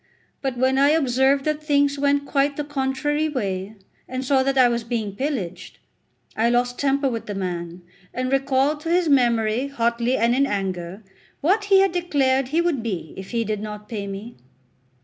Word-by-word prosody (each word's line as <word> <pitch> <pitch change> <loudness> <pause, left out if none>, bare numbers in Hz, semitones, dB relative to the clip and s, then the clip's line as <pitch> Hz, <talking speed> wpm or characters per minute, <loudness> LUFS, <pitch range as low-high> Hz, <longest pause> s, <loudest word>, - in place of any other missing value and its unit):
But 265 -3 -2
when 260 +2 +2
I 280 +1 +5
observed 270 -2 +2
that 305 0 -1
things 285 -2 +1
went 285 0 +2
quite 280 0 0
the 295 - -1
contrary 290 +2 -1
way, 200 -6 -3 0.3
and 255 +1 -4
saw 265 0 +3
that 270 +1 0
I 255 -1 +7
was 235 -1 -1
being 225 -4 -3
pillaged, 255 - -4 0.6
I 230 +2 +2
lost 245 +1 0
temper 275 0 +1
with 230 -3 -4
the 205 - -4
man, 175 -2 -4 0.3
and 255 +1 -3
recalled 275 +2 +1
to 325 - -5
his 350 0 +2
memory 240 -3 +2
hotly 235 -1 0
and 235 +1 +2
in 275 +2 +2
anger 190 -2 -4 0.4
what 400 +7 +2
he 390 -1 +5
had 390 - +3
declared 275 -7 +1
he 315 +6 +1
would 340 -8 0
be 190 -9 -4
if 190 0 -8
he 230 -1 0
did 215 -1 -3
not 210 0 -7
pay 205 -3 -5
me. 200 +4 -8
260 Hz, 185 wpm, -23 LUFS, 220-285 Hz, 0.6 s, I